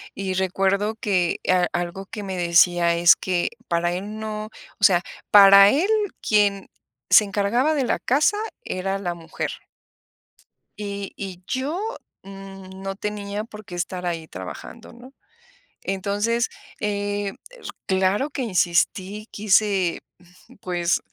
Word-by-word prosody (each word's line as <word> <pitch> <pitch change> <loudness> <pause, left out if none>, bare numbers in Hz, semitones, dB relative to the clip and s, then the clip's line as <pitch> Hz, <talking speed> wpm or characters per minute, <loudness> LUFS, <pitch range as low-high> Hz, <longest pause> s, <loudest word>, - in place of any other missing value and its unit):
Y 195 -1 -3
recuerdo 195 +3 0
que 185 -6 0
a 180 -1 +4
algo 175 +3 -3
que 210 -1 -7
me 190 -1 -4
decía 170 0 +4
es 170 0 +6
que 180 -2 -1 0.2
para 175 0 0
él 205 +4 -5
no, 215 -1 -4 0.3
o - - -9
sea, 180 -4 +6 0.3
para 200 -1 +9
él 305 - +2 0.3
quien 205 -2 +2 0.4
se 215 - +8
encargaba 215 +10 +1
de 280 - +1
la - - 0
casa 295 +10 +2 0.3
era 195 +1 -2
la 175 -3 -3
mujer. 165 -1 -5 1.3
Y 200 -1 -5
y 190 -3 -7
yo, 275 +7 -2 0.4
mm, 195 -1 -11
no 195 0 -4
tenía 205 0 -4
por 215 -2 -11
qué 180 - -8
estar 180 +1 -4
ahí 165 -2 -3
trabajando, 95 - -9
¿no? 250 +3 -14 0.7
Entonces, 205 +5 -1 0.3
eh 205 -1 -2 0.2
eh, - - -15 0.3
claro 190 +8 +1
que 275 - -4
insistí, 195 0 0
quise, 200 -3 +2 0.2
mm, 180 +1 -21
pues, 175 -1 0
195 Hz, 135 wpm, -23 LUFS, 180-210 Hz, 1.3 s, para